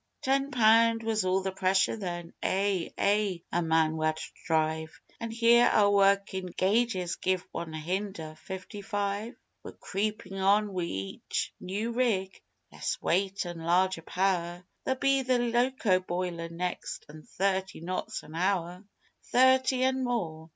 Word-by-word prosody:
Ten 275 Hz, +1 st, +1 dB
pound 230 Hz, -2 st, +4 dB
was 220 Hz, -2 st, 0 dB
all 185 Hz, +1 st, +2 dB
the 190 Hz, -, -1 dB
pressure 190 Hz, +1 st, +2 dB
then 175 Hz, -5 st, -5 dB
Eh! 195 Hz, -2 st, 0 dB
Eh! 200 Hz, -2 st, +2 dB
a -, -, +1 dB
man 160 Hz, -1 st, +2 dB
wad 155 Hz, 0 st, 0 dB, 0.3 s
drive; 160 Hz, 0 st, 0 dB, 0.2 s
An' 230 Hz, -, -4 dB
here, 235 Hz, +1 st, +5 dB
our 205 Hz, -1 st, +4 dB
workin' 195 Hz, -1 st, +2 dB
gauges 190 Hz, -1 st, 0 dB
give 185 Hz, -1 st, 0 dB
one 165 Hz, -1 st, -5 dB
hunder' 165 Hz, 0 st, -4 dB
fifty 190 Hz, +1 st, -7 dB
five! 205 Hz, +3 st, -3 dB, 0.3 s
We're -, -, -9 dB
creepin' 195 Hz, -1 st, -3 dB
on 200 Hz, +1 st, +3 dB
wi' 180 Hz, -2 st, -1 dB
each 95 Hz, -, -4 dB
new 205 Hz, +5 st, -3 dB
rig 215 Hz, -6 st, 0 dB, 0.3 s
less -, -, -3 dB
weight 195 Hz, +2 st, 0 dB
an' 175 Hz, -1 st, -6 dB
larger 175 Hz, +2 st, +2 dB
power: 175 Hz, 0 st, -1 dB, 0.2 s
There'll 265 Hz, 0 st, -1 dB
be 275 Hz, 0 st, +3 dB
the 255 Hz, -1 st, +2 dB
loco 240 Hz, -4 st, +2 dB
boiler 175 Hz, -2 st, -3 dB
next 175 Hz, +2 st, -4 dB
an' 155 Hz, +1 st, -11 dB
thirty 190 Hz, +2 st, -1 dB
knots 180 Hz, +3 st, -4 dB
an 155 Hz, -, -12 dB
hour! 180 Hz, +1 st, -1 dB, 0.4 s
Thirty 260 Hz, 0 st, +4 dB
an' 260 Hz, 0 st, +1 dB
more. 165 Hz, -10 st, -3 dB
190 Hz, 145 wpm, -29 LUFS, 175-225 Hz, 0.4 s, here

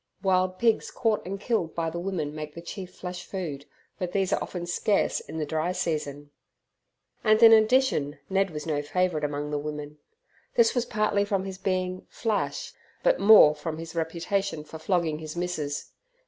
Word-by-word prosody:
Wild 185 Hz, -1 st, +2 dB
pigs 230 Hz, 0 st, +2 dB
caught 225 Hz, -3 st, 0 dB
and 195 Hz, +1 st, -4 dB
killed 205 Hz, -7 st, -1 dB
by 165 Hz, -1 st, -1 dB
the 170 Hz, -, -4 dB
women 170 Hz, -5 st, -3 dB
make 150 Hz, -1 st, -7 dB
the 170 Hz, -, -7 dB
chief 185 Hz, 0 st, -7 dB
flesh 180 Hz, 0 st, -6 dB
food, 155 Hz, -8 st, -5 dB, 0.3 s
but 180 Hz, -2 st, -3 dB
these 190 Hz, -2 st, +1 dB
are -, -, +1 dB
often 175 Hz, -2 st, -4 dB
scarce 185 Hz, +4 st, +1 dB
in -, -, -8 dB
the 155 Hz, -, -1 dB
dry 160 Hz, +4 st, -1 dB
season. 145 Hz, -4 st, -3 dB, 0.9 s
And 215 Hz, +1 st, +4 dB
in 225 Hz, 0 st, +10 dB
addition 220 Hz, -, +3 dB
Ned 195 Hz, 0 st, +1 dB
was 150 Hz, -3 st, -6 dB
no 150 Hz, -3 st, 0 dB
favourite 165 Hz, +1 st, 0 dB
among 145 Hz, 0 st, -2 dB
the 145 Hz, -, 0 dB
women. 150 Hz, 0 st, -6 dB, 0.6 s
This 470 Hz, -2 st, +5 dB
was 245 Hz, -2 st, 0 dB
partly 210 Hz, -2 st, +1 dB
from 195 Hz, -2 st, -1 dB
his 190 Hz, -1 st, -6 dB
being 185 Hz, -1 st, -2 dB
"flash", 225 Hz, -, -2 dB, 0.3 s
but -, -, +3 dB
more 200 Hz, -8 st, +8 dB
from 155 Hz, +1 st, -5 dB
his 165 Hz, 0 st, -7 dB
reputation 170 Hz, +1 st, -2 dB
for 160 Hz, +1 st, -10 dB
flogging 160 Hz, -2 st, 0 dB
his 155 Hz, 0 st, -7 dB
missus. 165 Hz, -5 st, -3 dB
180 Hz, 175 wpm, -27 LUFS, 155-200 Hz, 0.9 s, in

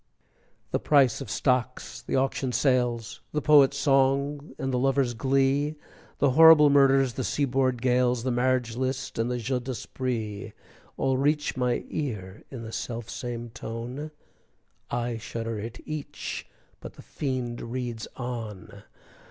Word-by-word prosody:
The -, -, +1 dB
price 135 Hz, -5 st, +3 dB
of -, -, -6 dB
stocks, 125 Hz, -1 st, -1 dB
the -, -, -3 dB
auction 135 Hz, -1 st, 0 dB
sales, 120 Hz, -6 st, +1 dB
The 150 Hz, -, 0 dB
poet's 140 Hz, -2 st, +6 dB
song 140 Hz, +1 st, +1 dB
and 135 Hz, -1 st, -2 dB
the 125 Hz, -, +1 dB
lover's 135 Hz, -1 st, +2 dB
glee, 135 Hz, +4 st, +1 dB, 0.4 s
The 140 Hz, -, +3 dB
horrible 155 Hz, 0 st, +8 dB
murders, 135 Hz, -2 st, +4 dB
the 130 Hz, -, -3 dB
sea 145 Hz, +4 st, 0 dB
board 130 Hz, -2 st, 0 dB
gales, 125 Hz, -1 st, +2 dB
The 130 Hz, -, 0 dB
marriage 125 Hz, -1 st, +1 dB
list, 130 Hz, 0 st, -3 dB
and 115 Hz, +2 st, +1 dB
the 125 Hz, -, -1 dB
jeu 125 Hz, +2 st, -1 dB
d'esprit, 120 Hz, -4 st, -4 dB, 0.4 s
All 130 Hz, -1 st, +1 dB
reach 150 Hz, +2 st, +1 dB
my 125 Hz, -2 st, 0 dB
ear 105 Hz, -10 st, -4 dB
in 125 Hz, -4 st, -7 dB
the 110 Hz, -, -7 dB
self 115 Hz, -1 st, -5 dB
same 120 Hz, -2 st, -5 dB
tone, 120 Hz, +6 st, -6 dB, 0.8 s
I 120 Hz, -1 st, -2 dB
shudder 115 Hz, 0 st, -4 dB
at 115 Hz, +3 st, -7 dB
each, 155 Hz, -2 st, -5 dB, 0.3 s
but -, -, -9 dB
the -, -, -14 dB
fiend 130 Hz, -4 st, -3 dB
reads 120 Hz, -1 st, -4 dB
on! 115 Hz, -6 st, -6 dB
125 Hz, 145 wpm, -27 LUFS, 120-135 Hz, 0.8 s, horrible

